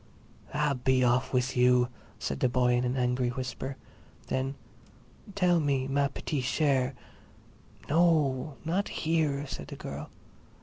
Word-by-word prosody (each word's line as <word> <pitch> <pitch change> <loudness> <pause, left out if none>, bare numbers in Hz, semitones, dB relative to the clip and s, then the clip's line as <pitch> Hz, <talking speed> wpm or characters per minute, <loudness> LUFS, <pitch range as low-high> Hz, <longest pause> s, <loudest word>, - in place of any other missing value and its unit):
"Ah, 150 -1 +1
be 130 -1 +3
off 125 +1 +2
with 125 0 0
you!" 125 0 +4 0.3
said 70 - -3
the - - +3
boy 125 0 +2
in 120 +1 +2
an 125 +1 0
angry 125 0 +1
whisper. 130 +1 -5 0.5
Then: 135 +1 -1 0.8
"Tell 180 -3 +3
me, 140 -3 0
ma 140 +1 +2
petite 140 0 -3
chère—" 135 -2 +1 0.9
"No, 150 -4 +2
not 185 +5 0 0.2
here," 155 -3 +1
said 75 - -7
the - - -7
girl. - - -7
130 Hz, 135 wpm, -29 LUFS, 125-150 Hz, 0.9 s, you